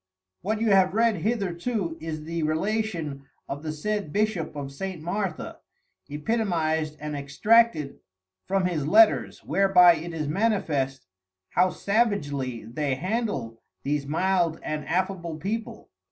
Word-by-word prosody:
What 215 Hz, +3 st, -1 dB
you 225 Hz, -1 st, +2 dB
have 190 Hz, 0 st, +4 dB
read 225 Hz, -2 st, +3 dB
hitherto 195 Hz, -2 st, -1 dB
is 155 Hz, -1 st, -5 dB
the 165 Hz, +1 st, -3 dB
Relation 160 Hz, -4 st, -2 dB, 0.2 s
of 140 Hz, +1 st, -5 dB
the 155 Hz, 0 st, -3 dB
said 200 Hz, +2 st, -3 dB
Bishop 205 Hz, -6 st, -1 dB
of 140 Hz, -1 st, -5 dB
St. 185 Hz, +4 st, -5 dB
Martha, 175 Hz, +1 st, -3 dB, 0.5 s
Epitomized 160 Hz, -2 st, -1 dB
and 150 Hz, 0 st, -4 dB
Extracted 150 Hz, +3 st, +2 dB, 0.5 s
from 195 Hz, -1 st, +1 dB
his 160 Hz, -6 st, -1 dB
Letters, 220 Hz, +5 st, +4 dB
whereby 180 Hz, -3 st, +6 dB
it 170 Hz, +2 st, -6 dB
is 155 Hz, -3 st, -3 dB
manifest, 150 Hz, -8 st, 0 dB, 0.5 s
how 185 Hz, +1 st, +3 dB
Savagely 145 Hz, -, -1 dB
they 135 Hz, +4 st, -2 dB
handle 145 Hz, -, -3 dB, 0.2 s
these 140 Hz, 0 st, -1 dB
mild 170 Hz, +1 st, +1 dB
and 150 Hz, -1 st, -4 dB
affable 175 Hz, -1 st, -1 dB
People. 215 Hz, +8 st, -5 dB
170 Hz, 125 wpm, -26 LUFS, 150-205 Hz, 0.5 s, whereby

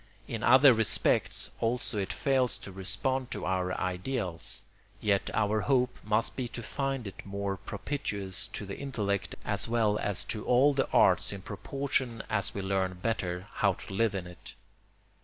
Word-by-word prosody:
In -, -, -4 dB
other 130 Hz, +2 st, +8 dB
respects 110 Hz, -2 st, +2 dB
also 115 Hz, -1 st, 0 dB
it 95 Hz, -, -2 dB
fails 130 Hz, -3 st, +1 dB
to 95 Hz, -, -9 dB
respond 100 Hz, +8 st, -1 dB
to -, -, -4 dB
our 90 Hz, -1 st, 0 dB
ideals; 90 Hz, 0 st, -2 dB, 0.4 s
yet 100 Hz, -2 st, +1 dB
our 105 Hz, 0 st, +1 dB
hope 125 Hz, -1 st, +2 dB
must 105 Hz, +2 st, +1 dB
be 130 Hz, -2 st, -2 dB
to 120 Hz, 0 st, -7 dB
find 135 Hz, 0 st, -2 dB
it 95 Hz, -2 st, -8 dB
more 100 Hz, 0 st, -3 dB
propitious 100 Hz, -2 st, -3 dB
to 105 Hz, -, -6 dB
the 100 Hz, -, -7 dB
intellect 105 Hz, -8 st, -2 dB
as -, -, 0 dB
well 110 Hz, -3 st, +2 dB
as 100 Hz, -3 st, -2 dB
to 105 Hz, -, -4 dB
all 135 Hz, +4 st, +4 dB
the 135 Hz, -1 st, 0 dB
arts -, -, +4 dB
in 100 Hz, -2 st, -7 dB
proportion 125 Hz, +2 st, -2 dB
as 100 Hz, -3 st, +1 dB
we 100 Hz, -, -3 dB
learn 95 Hz, -1 st, 0 dB
better 90 Hz, -5 st, -1 dB
how 100 Hz, -2 st, +3 dB
to 95 Hz, -, -10 dB
live 105 Hz, 0 st, +1 dB
in 95 Hz, -2 st, -3 dB
it. 90 Hz, -1 st, -11 dB
105 Hz, 165 wpm, -30 LUFS, 95-125 Hz, 0.4 s, other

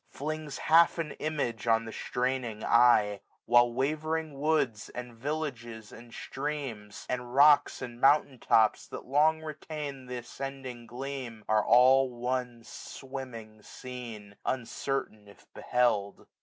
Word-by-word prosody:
Flings 155 Hz, -1 st, -5 dB
half 165 Hz, +2 st, +4 dB
an 160 Hz, -3 st, -3 dB
image 140 Hz, -8 st, -2 dB
on 115 Hz, 0 st, +3 dB
the 115 Hz, -, -7 dB
straining 125 Hz, -4 st, -2 dB
eye 115 Hz, -4 st, +4 dB
j -, -, -28 dB, 0.2 s
While 120 Hz, 0 st, +5 dB
wavering 155 Hz, +3 st, -2 dB
woods, 140 Hz, -8 st, 0 dB
and 125 Hz, -1 st, -7 dB
villages, 120 Hz, -4 st, -5 dB
and 120 Hz, 0 st, -13 dB
streams. 125 Hz, -9 st, -5 dB
SUMMER. -, -, -5 dB
iii -, -, -10 dB
And 120 Hz, -, -9 dB
rocks, 145 Hz, +1 st, +5 dB
and 120 Hz, -1 st, -8 dB
mountain 140 Hz, -2 st, +4 dB
tops, 110 Hz, -1 st, +3 dB
that -, -, -8 dB
long 155 Hz, +4 st, +3 dB
retained 150 Hz, -4 st, -7 dB
1690 125 Hz, -1 st, -4 dB
Th' 120 Hz, -, -12 dB
ascending 130 Hz, -2 st, -7 dB
gleam, 125 Hz, -2 st, -6 dB
are 110 Hz, -1 st, +3 dB
all 130 Hz, +2 st, +5 dB
one 125 Hz, -1 st, -3 dB
swimming 115 Hz, -5 st, -9 dB
scene; 115 Hz, -5 st, -9 dB
Uncertain 125 Hz, -3 st, -3 dB
if 100 Hz, -, -17 dB
beheld. 110 Hz, -5 st, 0 dB
125 Hz, 140 wpm, -29 LUFS, 115-140 Hz, 0.2 s, While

